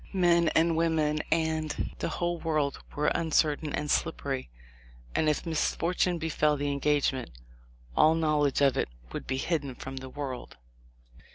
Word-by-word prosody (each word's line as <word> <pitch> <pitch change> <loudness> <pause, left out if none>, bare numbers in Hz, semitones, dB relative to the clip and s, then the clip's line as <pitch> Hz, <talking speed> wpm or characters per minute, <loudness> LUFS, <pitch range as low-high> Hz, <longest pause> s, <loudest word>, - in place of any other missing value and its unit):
Men 170 -3 +4
and 165 +1 +4
women 160 -2 +1
and 160 -2 0
the - - -1
whole 175 -1 -2
world 155 -4 0 0.2
were 150 +1 +2
uncertain 155 -2 +1
and 150 +1 -2
slippery, 140 - -1 0.6
and 155 - +2
if 150 - -1
misfortune 170 +2 0
befell 155 -2 +1
the 145 0 -1
engagement 140 -3 +1 0.7
all 155 +1 +5
knowledge 150 -3 +2
of 140 -2 +4
it - - 0 0.2
would - - -5
be 130 - -1
hidden 140 -3 -1
from 135 +1 -7
the 130 0 -6
world." 135 - -6
155 Hz, 145 wpm, -29 LUFS, 140-165 Hz, 0.7 s, all